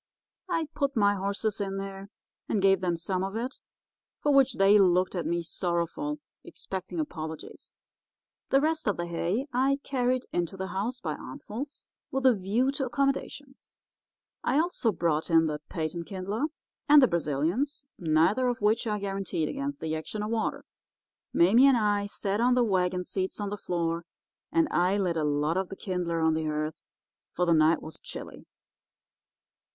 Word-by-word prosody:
I 330 -3 0
put 280 -1 -1
my 205 -1 +4
horses 200 +2 -2
in 195 -1 -2
there 195 0 -6 0.4
and 215 - +1
gave 195 -1 +4
them 175 -2 0
some 185 +2 -2
of 195 +2 -4
it, 245 +4 -4 0.6
for 295 - +2
which 270 -1 +5
they 200 +2 +6
looked 185 -1 +3
at 175 -3 -2
me 170 0 0
sorrowful, 175 - -2 0.3
expecting 185 -2 -6
apologies. 155 0 -6 0.7
The 270 - +4
rest 315 -1 0
of 205 - +1
the 175 - -2
hay 175 +8 -1
I 265 +2 +3
carried 255 -1 0
into 175 +1 -1
the 190 0 -4
house 225 +7 -2
by 155 -3 -2
armfuls, 220 - -7 0.2
with 265 0 -2
a 260 - +7
view 215 +7 +1
to 275 -1 -2
accommodations. 275 +1 -2 0.7
I - - +2
also 320 -9 +1
brought 165 -3 0
in 165 -1 +5
the 150 -1 -2
patent 165 0 -3
kindler 200 +7 -2 0.4
and 295 0 +9
the 260 - +6
Brazilians, 170 - -1
neither 165 +10 +3
of 245 -1 -1
which 215 +3 +2
are 210 -1 0
guaranteed 195 -5 -2
against 280 0 -4
the 160 0 -2
action 210 +7 -4
of 215 - -3
water. 225 -1 -1 0.7
"Mame 190 +8 +5
and 270 -1 +7
I 205 -2 +1
sat 205 +1 -2
on 250 +1 +4
the 250 - +4
wagon 180 -4 +1
seats 190 +2 -3
on 205 -1 -3
the - - -1
floor, 170 -3 -2 0.5
and 330 -1 +3
I 180 +3 +2
lit 180 -4 0
a 160 - 0
lot 150 +3 +1
of 190 -1 -1
the 195 - -6
kindler 180 -4 -2
on 160 0 +3
the 160 0 -1
hearth, 155 0 -1 0.6
for 180 - +2
the 170 - +4
night 160 +1 +4
was 155 - -9
chilly. - - -9
195 Hz, 170 wpm, -28 LUFS, 170-245 Hz, 0.7 s, and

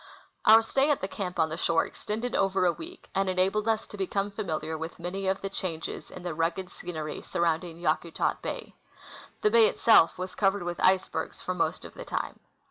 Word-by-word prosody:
Our 220 +1 +9
stay 270 +5 +2
at 290 - +3
the 190 - -1
camp 185 -2 -5
on 160 -1 +3
the 160 - -4
shore 165 -1 +2
extended 225 +3 -4
OA^er 195 -1 +2
a 175 - +3
Aveek, 355 +3 -10
and 195 0 +1
enabled 190 +4 +1
us 220 -1 +1
to 205 - -10
become 195 +1 -1
familiar 160 -6 -3
Avith 160 +1 -6
many 190 +3 -4
of 190 0 0
the 195 - -3
changes 170 -5 -4
in 180 - -10
the 175 -2 -3
rugged 165 +4 -1
scenery 155 -4 -5
surrounding 170 0 -1
Yakutat 165 0 0
bay. - - -5 0.7
The 210 - +4
bay 230 -1 +7
itself 220 -8 +5
Avas 185 0 -5
covered 195 -1 +2
with 175 0 -4
icebergs 185 0 +1
for - - -1
most - - -1
of - - -10
the - - -8
time. - - -4
185 Hz, 200 wpm, -28 LUFS, 170-205 Hz, 0.7 s, Our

